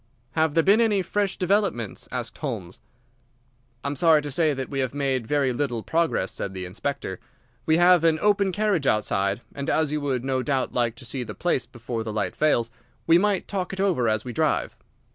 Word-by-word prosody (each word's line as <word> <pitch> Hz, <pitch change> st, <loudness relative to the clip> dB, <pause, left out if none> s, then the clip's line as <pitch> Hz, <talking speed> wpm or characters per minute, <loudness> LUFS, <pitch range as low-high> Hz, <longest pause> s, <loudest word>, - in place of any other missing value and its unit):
"Have 160 Hz, 0 st, +1 dB
there 165 Hz, -, +4 dB
been 205 Hz, +6 st, +5 dB
any 210 Hz, -4 st, +2 dB
fresh 200 Hz, 0 st, -1 dB
developments?" 185 Hz, -, 0 dB
asked 120 Hz, -2 st, -5 dB
Holmes. 110 Hz, -, -5 dB, 1.0 s
"I -, -, -2 dB
am 145 Hz, -, -3 dB
sorry 155 Hz, 0 st, +4 dB
to 145 Hz, -, -5 dB
say 155 Hz, +3 st, +2 dB
that 135 Hz, -2 st, -3 dB
we 135 Hz, -, -4 dB
have 130 Hz, +1 st, -1 dB
made 135 Hz, -5 st, -1 dB
very 140 Hz, -2 st, +1 dB
little 120 Hz, -4 st, -2 dB
progress," 160 Hz, -, 0 dB
said 95 Hz, -1 st, -5 dB
the 90 Hz, -1 st, -4 dB
Inspector. 95 Hz, 0 st, -4 dB, 0.5 s
"We 160 Hz, 0 st, +4 dB
have 175 Hz, -1 st, +5 dB
an 165 Hz, -1 st, +4 dB
open 200 Hz, -1 st, +2 dB
carriage 195 Hz, -7 st, 0 dB
outside, 100 Hz, 0 st, +1 dB
and 140 Hz, 0 st, -4 dB
as 155 Hz, -2 st, +1 dB
you 150 Hz, 0 st, -1 dB
would 130 Hz, -4 st, -1 dB
no 130 Hz, -1 st, 0 dB
doubt 130 Hz, +1 st, -1 dB
like 120 Hz, -2 st, 0 dB
to 125 Hz, -, -12 dB
see 125 Hz, +2 st, -4 dB
the 125 Hz, -, -6 dB
place 175 Hz, -7 st, 0 dB
before 115 Hz, -1 st, -5 dB
the 110 Hz, -, -4 dB
light 105 Hz, -1 st, -2 dB
fails, 120 Hz, -7 st, +2 dB, 0.3 s
we 165 Hz, +1 st, +6 dB
might 200 Hz, -1 st, +1 dB
talk 190 Hz, -2 st, -3 dB
it 190 Hz, -, -6 dB
over 175 Hz, -, +2 dB
as 110 Hz, +2 st, -1 dB
we 125 Hz, -, -5 dB
drive." -, -, 0 dB
140 Hz, 205 wpm, -25 LUFS, 120-175 Hz, 1.0 s, we